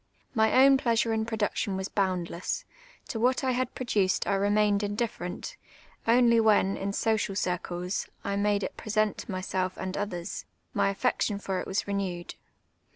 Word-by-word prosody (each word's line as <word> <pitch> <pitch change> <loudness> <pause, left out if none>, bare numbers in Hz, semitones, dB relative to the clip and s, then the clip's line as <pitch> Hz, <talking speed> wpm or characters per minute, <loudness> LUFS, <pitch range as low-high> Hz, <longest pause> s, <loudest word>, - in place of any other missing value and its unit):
My 225 +3 +5
own 275 -1 +6
])leasure 230 -1 +2
in 220 0 -1
production 210 -3 -1
was 190 0 -3
boundless; 185 -3 -1 0.4
to 225 - -3
what 250 +4 +2
I 260 - +2
had 255 0 -1
j)roduced 205 -7 +1
I - - +2
remained 205 +1 +3
indiffe 205 +2 -2
rent: 180 +1 -6 0.5
only 235 0 +5
when, 210 -3 +4
in 195 +1 -2
social 215 -1 0
circles, 180 0 -2 0.2
I 200 - -1
made 205 0 +1
it - - -4
present 215 -1 0
to - - -6
myself 185 0 -2
and 190 0 -4
others, 195 -3 -4 0.3
my 200 -1 +2
affection 205 0 0
ft)r 195 -2 -2
it - - -7
was 190 - -1
renewed. 190 -4 -3
205 Hz, 160 wpm, -28 LUFS, 190-225 Hz, 0.5 s, own